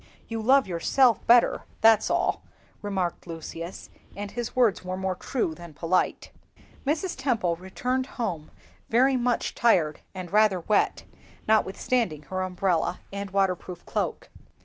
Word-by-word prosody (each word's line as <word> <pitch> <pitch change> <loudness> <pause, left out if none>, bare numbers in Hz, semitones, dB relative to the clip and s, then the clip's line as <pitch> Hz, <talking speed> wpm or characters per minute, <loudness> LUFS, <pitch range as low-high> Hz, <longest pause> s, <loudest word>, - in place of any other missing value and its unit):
"You 225 -1 -4
love 265 +4 +5
yourself 225 +8 +2
better, 240 0 +5 0.2
that's 220 -1 +5
all," - - +1 0.4
remarked 190 -4 -3
Lucius; 165 +1 -7 0.2
and 205 0 -6
his 240 -1 -5
words 240 -7 +3
were 185 0 -4
more 190 0 -1
true 185 -1 -2
than 170 -1 -12
polite. 170 +4 0 0.6
Mrs. 330 +5 0
Temple 230 -11 0
returned 250 +8 -2
home 175 -11 -3 0.4
very 260 +4 +4
much 245 -1 0
tired 170 -10 +2 0.2
and 185 -1 -7
rather 210 -4 +4
wet, 210 +4 +1 0.4
notwithstanding 215 -5 +1
her 185 +5 -4
umbrella 180 -2 0
and 200 0 -4
waterproof 185 -2 -1
cloak. - - -3
195 Hz, 130 wpm, -26 LUFS, 180-235 Hz, 0.6 s, love